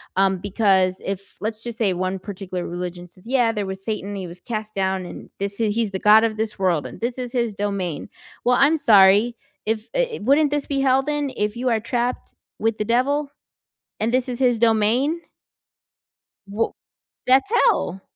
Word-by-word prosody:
um, 190 0 +3
because 190 -1 +1
if 195 0 -5
let's 220 +1 -3
just 235 -1 -6
say 200 -5 +2
1 185 +1 -2
particular 185 -2 -6
religion 175 0 -6
says, 185 +3 -20
yeah, 245 -3 +2
there 210 -3 -3
was 190 0 -6
Satan. 205 -2 -4
He 185 -2 -5
was 175 +1 -12
cast 215 -3 -5
down, 190 -1 -1
and - - -10
this 200 +2 -4
is 215 -2 +1
he's 230 -3 +1
the 190 - -2
god 215 +2 +6
of 215 -1 0
this 215 -2 -3
world, 175 -5 +1
and - - -9
this 240 +2 -2
is 250 -1 -5
his 235 -4 -1
domain. 200 -4 -3 0.4
Well, 250 0 +4
I'm 310 +3 +4
sorry, 210 -1 +5 0.3
if, 220 0 -2
eh, - - -1
wouldn't 285 +5 +3
this 290 -1 -1
be 275 -1 -1
hell 265 0 +4
then 295 -1 -2
if 210 +2 -2
you 255 +1 -2
are 225 -2 +2
trapped 240 +2 -3 0.2
with 225 0 0
the 210 - -2
devil 275 +5 +1 0.7
and 225 +2 0
this 255 0 +2
is 245 - -3
his 245 -3 +3
domain? 235 +8 +2 1.3
Wha 210 +3 -1 0.6
that's 270 +9 +4
hell! 195 - +2
220 Hz, 190 wpm, -22 LUFS, 195-245 Hz, 1.3 s, god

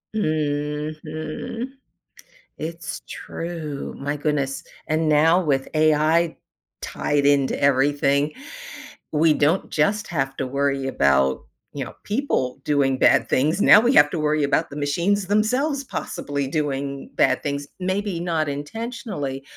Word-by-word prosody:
Mhm, 155 - -3 0.9
it's 165 +1 -6
true, 160 -4 -6
my 145 +2 -3
goodness, 140 -2 -1 0.2
and 155 +1 +1
now 160 +4 +4
with 135 -4 0
AI 155 +2 +3 0.4
tied 145 -1 -1
into 140 -2 +2
everything. 140 +1 +2 0.8
We 155 +1 +4
don't 150 +5 +1
just 205 +8 +1
have 135 -5 -2
to - - -2
worry 140 0 -1
about, 70 - +2 0.3
you - - -3
know, - - -9
people 205 - -1
doing 135 -3 +1
bad - - +4
things. 155 +9 +2
Now 210 - +8
we 240 +3 +2
have 145 - +7
to 165 - -2
worry 150 0 +1
about 140 - +1
the 145 - -8
machines 175 +7 0
themselves 255 +8 +1
possibly 145 - -4
doing 140 -2 -3
bad - - +2
things, 140 -1 -3
maybe 185 -1 -1
not 165 -3 0
intentionally, 150 - -5
150 Hz, 125 wpm, -23 LUFS, 140-170 Hz, 0.9 s, Now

